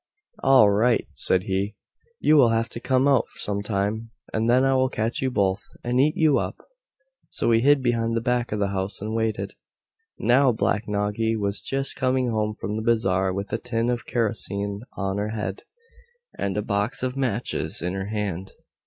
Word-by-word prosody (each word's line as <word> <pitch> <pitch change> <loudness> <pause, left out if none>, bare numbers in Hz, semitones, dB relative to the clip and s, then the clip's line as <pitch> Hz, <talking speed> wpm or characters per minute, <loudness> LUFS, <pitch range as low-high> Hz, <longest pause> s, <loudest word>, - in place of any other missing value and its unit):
"All 130 -6 +6
right," 115 +4 +2
said 95 -1 +1
he, 100 +2 -2 0.4
"you 155 - +4
will 130 -6 +6
have 115 +1 0
to - - -6
come 130 +2 +2
out 135 -4 +3
some 100 0 -2
time, 105 +2 -2 0.2
and 110 +1 +1
then 130 +2 +4
I 135 - +3
will 130 0 +2
catch 110 0 -2
you 130 - +1
both, 100 -5 +1 0.2
and 125 +1 +2
eat 150 +3 +2
you 155 -3 +4
up." - - -3 0.7
So - - 0
he 115 - +5
hid 140 +2 +4
behind 115 -2 +1
the - - +2
back 125 0 0
of 105 - -1
the 100 -1 0
house 95 0 -2
and 110 +2 -4
waited. 110 -1 -1 0.6
Now 130 +2 +4
Black 105 0 0
Noggy 105 +2 0
was 100 -2 -2
just 135 0 -2
coming 130 -1 +1
home 105 -1 -1
from 105 0 -4
the - - -2
bazaar 95 -5 +1
with 100 +2 -4
a 110 - 0
tin 120 0 -1
of 120 -1 -4
kerosene 100 -3 -2 0.2
on 95 0 -2
her 105 +1 -2
head, 95 -2 -4 0.7
and 100 0 -2
a 105 - 0
box 105 +4 0
of 130 0 -1
matches 125 -4 -1
in 90 +2 -2
her 95 0 -3
hand. 100 -3 -3
110 Hz, 190 wpm, -24 LUFS, 100-125 Hz, 0.7 s, All